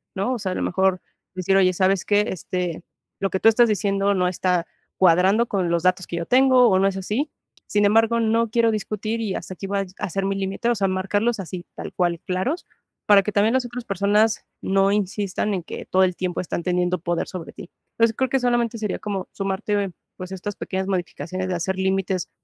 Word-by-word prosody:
¿no? 200 +7 0
O 245 - -3
sea, 195 -3 -2
a - - -5
lo - - -2
mejor 190 0 +1 0.3
decir: 185 +1 +1
"Oye, 185 -1 +4
¿sabes 190 +1 +1
qué? 205 0 +3
Este, 180 -1 -3 0.4
lo 195 - 0
que 190 - -1
tú 225 - +6
estás 235 +1 +4
diciendo, 200 -1 +1
no 180 -2 +1
está 180 -1 0 0.3
cuadrando 190 +6 +4
con 190 -5 -1
los 170 -1 +1
datos 185 0 +1
que 170 - -4
yo 170 - -3
tengo 255 0 +5
o 190 -2 +3
no 195 - +4
es 195 - -2
así. 215 +10 -2 0.4
Sin 205 0 +2
embargo, 225 +3 +4
no 230 0 +2
quiero 230 -1 +3
discutir 215 +1 -3
y 205 -4 -2
hasta - - -6
aquí 195 - -6
va 200 0 0
a - - -3
ser 195 +2 -2
mi 195 0 0
límite". 195 +4 -2
O 240 - +2
sea, 195 -2 +1
marcarlos 205 +5 0
así, 180 -1 -6
tal - - -7
cual, 175 -2 0
claros, 190 - -2 0.4
para 200 -2 +7
que 210 - -2
también 210 +3 +2
las 260 -1 +1
otras 245 0 -7
personas 205 +3 +1 0.2
no 195 +1 +2
insistan 205 0 -1
en 180 - -4
que - - -7
todo 190 0 +3
el 180 -1 +1
tiempo 180 -1 -2
están 175 -1 -3
teniendo 180 0 0
poder 170 +1 -2
sobre 180 -3 -7
ti. - - -11 0.3
Es 230 0 +4
creo 260 +3 -1
que 270 - +2
solamente 240 -2 +1
sería 210 -3 -3
como 195 -3 -4
sumarte, 195 0 -2 0.3
pues, 185 0 -7
estas 190 +2 -5
pequeñas 190 +1 -3
modificaciones 185 -1 -3
de 185 - -1
hacer 190 +2 -2
límites 190 -1 -1
195 Hz, 215 wpm, -23 LUFS, 185-215 Hz, 0.4 s, para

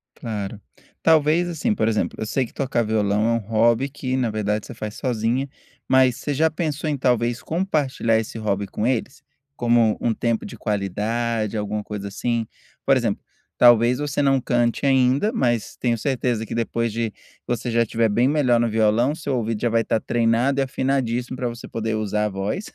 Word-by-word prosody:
Claro. 105 -2 -5 0.4
Talvez, 160 +2 +4
assim, 195 +7 -1
por 115 - 0
exemplo, 110 -2 0
eu - - -2
sei 130 +4 0
que - - -15
tocar 130 -3 0
violão 105 -1 +1
é 115 - +2
um 115 - +2
hobby 115 +4 +2
que, 130 -2 -3
na 125 -3 +1
verdade, 105 -1 -1
você - - -9
faz 110 -1 -6
sozinha, 125 +2 -1 0.4
mas 130 -2 +4
você 145 +2 -3
já 160 +3 +3
pensou 155 -1 -2
em, 145 - -1
talvez, 120 -1 +1
compartilhar 150 -10 0
esse 110 0 -4
hobby 100 -2 -1
com 105 +3 -3
eles? 130 +3 -2 0.3
Como 120 -3 +3
um 115 - +1
tempo 115 0 -1
de - - -9
qualidade, 110 +2 -1
alguma 105 0 -2
coisa 100 -1 -6
assim? 115 +2 -1 0.4
Por - - +5
exemplo, - - -1 0.3
talvez 120 +1 +5
você 145 -1 -1
não 135 -1 +3
cante 120 +2 0
ainda, 135 - +3
mas 120 - 0
tenho 120 -2 +1
certeza 120 -2 -1
que - - -7
depois 115 0 -1
de 115 -1 -2 0.3
você 120 0 -2
já 115 0 +3
estiver 115 0 +1
bem 120 +5 +2
melhor 135 -5 +3
no 120 - +1
violão, 115 +6 +2
seu 145 -5 -3
ouvido 115 -2 -2
já 120 - +2
vai 115 0 +2
estar 115 - 0
treinado 120 +4 +1
e - - +3
afinadíssimo 130 -2 -1
pra 125 -1 -2
você 120 0 -7
poder 110 -1 -2
usar 105 0 -1
a - - 0
voz. 100 - -3
120 Hz, 190 wpm, -22 LUFS, 110-130 Hz, 0.4 s, Por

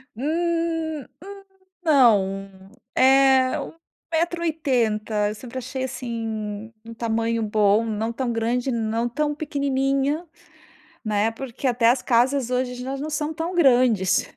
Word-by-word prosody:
Hum 325 +2 -1 0.2
hum, 395 0 -10 0.4
não. 195 - +2 0.2
Eh, 265 0 +5
1 - - -7 0.4
metro 340 +1 0
e - - +1
80. 220 -9 0
Eu 210 - -5
sempre 250 +3 -9
achei, 260 +2 -5
assim, 225 -3 -5
um 230 - -9
tamanho 230 0 -1
bom, 210 +1 +2
não 220 +1 -2
tão 240 0 -2
grande, 240 +3 -1
não 230 0 -1
tão 295 +4 -1
pequenininha, 280 +1 -1 0.8
né. 215 0 +1
Porque 260 +2 -5
até 235 -2 +3
as 250 +1 +2
casas 250 +1 +2
hoje 250 0 -2
elas 270 +1 -4
não 310 - -4
são 305 0 -2
tão 330 +3 -4
grandes 245 - +3
250 Hz, 135 wpm, -23 LUFS, 225-280 Hz, 0.8 s, Eh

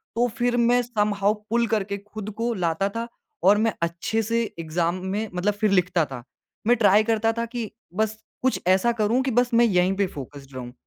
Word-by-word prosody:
तो 240 +1 +2
फिर 245 0 +1
मैं 240 +1 +4
समहाउ 210 -3 +1 0.2
पुल 235 +1 +2
करके 200 -2 -1
खुद 210 +1 -8
को 235 +1 0
लाता 180 +1 0
था 230 +1 -2 0.4
और 200 +2 +6
मैं 225 +1 +1
अच्छे 170 +7 -1
से 230 +2 0 0.2
एग्ज़ाम 165 +2 -1
में 205 +3 -2
मतलब 195 +4 0
फिर 205 0 0
लिखता 180 -3 +2
था। 120 - -8 0.4
मैं 240 - +6
ट्राई 210 -1 +5
करता 225 0 +1
था 230 - 0
कि 230 -2 -5 0.2
बस 215 +2 -1 0.2
कुछ 260 0 +1
ऐसा 190 +6 +4
करूँ 230 +3 +1
कि, 265 - -1
बस 245 +1 +2
मैं 235 +1 +6
यहीं 185 -2 +2
पे 200 -2 +2
फोकस्ड 140 -1 -10
रहूँ। 125 -1 -7
210 Hz, 200 wpm, -24 LUFS, 185-230 Hz, 0.4 s, और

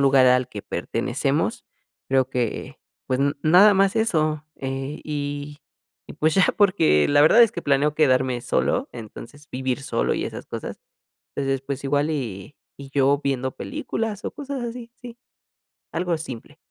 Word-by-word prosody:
lugar 135 -1 +5
al 125 0 +3
que 105 -5 -8
pertenecemos. - - -2 0.4
Creo 130 -1 +2
que, 120 -4 -3 0.3
pues, 130 - +1
n 140 +1 +2
nada 190 +6 +7
más 195 +2 +3
eso, 155 -8 0
eh, 135 +2 -4
y 145 -1 -4 0.5
y - - -9
pues 155 +1 +1
ya 190 - +5
porque 180 - +4
la 145 0 +4
verdad 220 +10 +7
es 230 - +5
que - - -5
planeo 145 +1 +2
quedarme 130 -4 +2
solo, - - 0
entonces 120 +6 -11
vivir 130 +1 -2
solo 140 - 0
y - - -2
esas - - -7
cosas, - - -6 0.6
entonces 135 -1 -1
pues 140 0 -5
igual 145 +2 +1
y 125 -5 -5 0.2
y 140 -1 -11
yo 140 0 +2
viendo 130 -1 -1
películas 225 -8 -4
o - - -3
cosas 280 -3 -5
así, 235 0 -7
sí. 240 -1 -9 0.8
Algo 175 0 -1
simple. 145 -1 -9
145 Hz, 160 wpm, -23 LUFS, 130-170 Hz, 0.8 s, nada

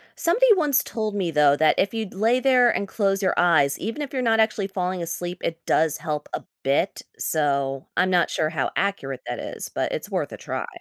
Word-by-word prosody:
Somebody 450 +8 +4
once 295 -6 +2
told 215 -2 -3
me 180 -5 -1
though 145 -2 +4
that 155 0 +3
if 200 +3 +1
you'd 220 -3 -4
lay 225 +6 +2
there 255 -2 +4
and 200 -3 -1
close 195 -1 0
your 185 - +2
eyes, 155 -6 +3
even 225 +8 -4
if 285 - -8
you're 260 - -1
not 225 -2 +2
actually 210 -2 +1
falling 185 -2 -3
asleep, 175 +1 -4
it 165 0 -4
does 160 -1 +2
help 150 -1 -4
a - - -3 0.2
bit. 140 +8 0 0.2
So 140 -3 -1
I'm 185 - +3
not 175 -2 +3
sure 155 - 0
how 160 - -1
accurate 135 -10 -2
that - - -4
is, - - -6
but - - -1
it's - - -5
worth - - -2
a - - -7
try. - - -4
185 Hz, 215 wpm, -24 LUFS, 155-225 Hz, 0.2 s, Somebody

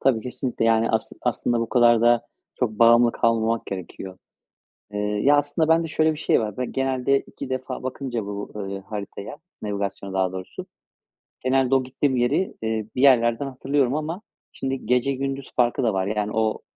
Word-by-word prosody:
Tabii, 130 -4 +3
kesinlikle. 125 -1 -3
Yani, 115 0 +3
as 110 0 -1
aslında 120 -1 0
bu 115 - -2
kadar 120 -2 +5
da 120 0 +3 0.3
çok 125 -4 0
bağımlı 120 0 +6
kalmamak 115 0 +1
gerekiyor. 95 0 -7 0.7
Eee, 105 - -2
ya, 105 +8 +3
aslında 145 +3 +1
bende 165 0 +3
şöyle 155 0 +2
bir 150 - -8
şey - - +2
var. 105 -3 -4
Ben 125 -1 -3
genelde 135 +1 +1
2 130 - -9
defa 130 0 -4
bakınca 125 -4 -4
bu, 100 0 -6
ııı, 100 -1 -5
haritaya, 100 +4 -7 0.3
navigasyona 100 -1 -3
daha 95 -1 0
doğrusu, 95 0 -7 0.8
genelde 130 0 +2
o 130 - +3
gittiğim 130 +1 -1
yeri, 125 +10 +1
eee, 110 -1 -1
bir 125 - 0
yerlerden 120 -1 +4
hatırlıyorum 135 0 0
ama 160 +6 -3 0.3
şimdi, 135 -2 -4
gece 125 +3 +2
gündüz 135 0 -4
farkı 120 0 +2
da 115 - +2
var. 95 0 0
Yani, 105 0 -1
o 110 0 0
120 Hz, 170 wpm, -24 LUFS, 110-135 Hz, 0.8 s, bağımlı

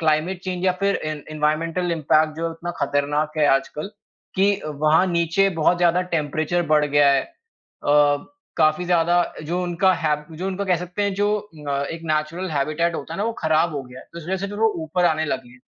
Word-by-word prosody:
Climate 160 +3 +1
change 185 -1 -3
या 185 - +4
फिर 200 0 +2
N 155 -1 -4
environmental 165 +4 0
impact 155 -1 +2
जो 165 - -3
है 165 - -1
उतना 165 +1 -6
खतरनाक 145 +2 0
है 150 - +4
आजकल 135 +5 -3 0.5
कि 200 +1 +3
वहाँ 155 +4 +2
नीचे 170 +2 +2
बहुत 170 +3 +4
ज़्यादा 175 +1 +3
टेम्परेचर 155 +3 -1
बढ़ 150 -1 +4
गया 145 -1 +4
है। 135 - +2
अ, - - -11 1.3
काफ़ी 155 +2 +3
ज़्यादा 175 0 +3 0.3
जो 175 +4 -2
उनका 180 +2 +2
हैब 150 -1 0
जो 185 - -3
उनका 195 +1 -3
कह 185 -2 +3
सकते 180 +4 -3
हैं 200 -1 0
जो 205 +1 +1 0.4
अ, 140 0 0
एक 165 0 -6
नैचरल 160 +5 -2
हैबिटैट 155 +4 0
होता 155 +2 -6
है - - -6
ना - - +1
वो 230 - -1
खराब 160 0 +2
हो 140 - -3
गया 125 0 -12
है। - - -16
तो 170 - -7
इस 160 - -11
वजह 190 +2 -1
से - - -5
जो 205 +1 -7
वो 225 - +5 0.2
ऊपर 180 +3 +1
आने 160 -1 +2
लगे 130 -4 -4
हैं। 125 - -18
165 Hz, 215 wpm, -22 LUFS, 150-180 Hz, 1.3 s, वो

